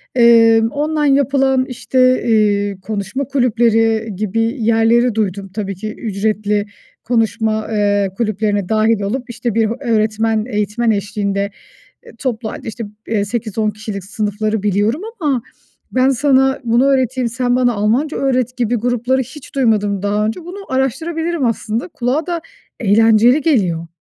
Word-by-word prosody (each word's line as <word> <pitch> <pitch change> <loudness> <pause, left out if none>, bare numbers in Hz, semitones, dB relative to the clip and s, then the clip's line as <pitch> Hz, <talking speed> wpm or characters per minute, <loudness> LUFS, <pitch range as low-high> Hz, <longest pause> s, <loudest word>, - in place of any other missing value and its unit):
eee, 230 -2 +6
online 295 -1 +1
yapılan 270 -1 +2
işte, 255 0 +1
iii, 205 -3 +2
konuşma 205 +6 -3
kulüpleri 225 -4 +1
gibi 215 +3 -1 0.2
yerleri 230 +1 +3
duydum. 200 -2 -2
Tabii 200 -2 -3
ki 215 +3 -6
ücretli 210 -1 -1 0.4
konuşma, 220 -2 0
eee, 205 -2 +1
kulüplerine 210 -3 -1
dâhil 220 0 +2
olup 245 +6 -3
işte 240 -1 -3
bir 225 -1 +2
öğretmen, 220 -2 0
eğitmen 210 +2 0
eşliğinde, 200 -1 -2 0.6
eee, - - -13
toplu 230 -4 -3
hâlde - - -8
işte 225 +1 -5 0.4
8-10 215 0 -2
kişilik 210 -2 -7
sınıfları 210 +1 -2
biliyorum 210 - +1 0.2
ama, 280 -7 0 0.5
"Ben 255 +1 +3
sana 265 0 +2
bunu 240 +3 +3
öğreteyim, 260 -2 +1
sen 245 +1 0
bana 250 -1 +2
Almanca 230 +9 0
öğret" 255 -2 0
gibi 245 -1 0
grupları 245 +3 0
hiç 275 +3 -12
duymadım 210 -7 +1
daha 205 +1 0
önce, 220 +10 -3
bunu 355 +3 -9
araştırabilirim 320 +5 -1
aslında, 230 +2 -2
kulağa 270 +2 -2
da 345 -2 -2 0.4
eğlenceli 225 +5 +4
geliyor. 190 - +1
225 Hz, 130 wpm, -17 LUFS, 210-255 Hz, 0.6 s, eee